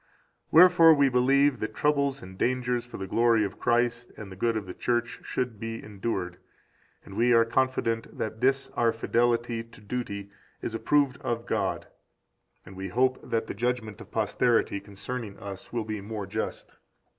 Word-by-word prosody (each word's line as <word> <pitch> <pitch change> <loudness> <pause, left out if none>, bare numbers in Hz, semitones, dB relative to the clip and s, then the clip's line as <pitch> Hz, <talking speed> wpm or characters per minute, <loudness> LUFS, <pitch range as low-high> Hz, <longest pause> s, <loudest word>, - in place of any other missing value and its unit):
Wherefore 165 -1 +8
we 140 -1 +4
believe 135 +1 +3
that 110 0 -4
troubles 140 -3 +1
and 95 0 -10
dangers 125 +2 0
for - - -8
the 95 - -4
glory 115 +2 +3
of 100 - -7
Christ 120 0 +1
and 105 -3 -9
the - - -8
good 115 +4 0
of 105 - -4
the 90 - -7
Church 120 +2 -1
should 120 -4 -3
be 115 +1 -5
endured, 95 -4 -4 0.7
and 95 - -11
we 120 +2 +3
are 115 0 +6
confident 115 -1 -1
that 110 0 -4
this 135 +1 +2
our 115 -1 +2
fidelity 120 0 0
to 115 0 -17
duty 100 -2 -5 0.3
is 115 - -4
approved 140 +3 +2
of 115 0 -2
God, 100 -5 -1 0.8
and 95 - -12
we 95 +1 -5
hope 130 +6 +1
that 115 0 -2
the - - -5
judgment 115 -1 -2
of - - -12
posterity 115 -1 +1
concerning 100 +2 -7
us 100 -2 -8
will 115 -2 -2
be 110 -1 -4
more 105 0 -5
just. 110 +3 -5
115 Hz, 170 wpm, -27 LUFS, 105-125 Hz, 0.8 s, Wherefore